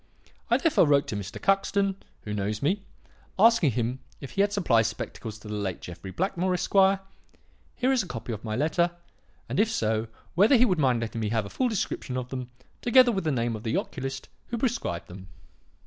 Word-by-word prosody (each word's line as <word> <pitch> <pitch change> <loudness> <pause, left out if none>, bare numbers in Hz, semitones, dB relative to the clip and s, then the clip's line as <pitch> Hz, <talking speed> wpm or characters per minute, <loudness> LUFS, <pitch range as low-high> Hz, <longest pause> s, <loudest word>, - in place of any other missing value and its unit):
I - - +5
therefore 325 - +3
wrote 140 -1 +4
to - - -2
Mr. 100 -1 -6
Cuxton, 195 0 +2 0.3
who 105 - -4
knows 105 +3 -2
me, 190 +8 +1 0.6
asking 210 - +5
him 120 +3 -1 0.2
if 140 - -8
he 195 - +1
had 200 0 +2
supplied 125 - +3
spectacles 115 -1 -6
to 110 - -13
the 105 - -5
late 100 -3 -3
Jeffrey 90 +2 -9
Blackmore, 185 - 0
Esq. - - -3 1.0
here 255 +1 +1
is 260 -3 +3
a 185 - -6
copy 115 -3 -5
of 105 - -7
my 110 -2 -3
letter 160 +6 +2 0.6
and - - -2
if 215 +1 +4
so, 110 - 0 0.3
whether 205 - +5
he 245 - +6
would 185 -8 +1
mind 130 -5 +2
letting 115 0 -3
me 105 - -1
have 110 -2 0
a 100 - -9
full 255 -1 0
description 160 - -2
of 125 -1 -4
them, 130 -2 -5 0.3
together 245 0 +6
with 190 -5 -2
the 155 - +2
name 120 -3 0
of 110 - -7
the 110 +1 -1
oculist 135 0 -4 0.2
who 235 - -3
prescribed 230 - -2
them. 95 +1 -11
135 Hz, 205 wpm, -27 LUFS, -, 1.0 s, he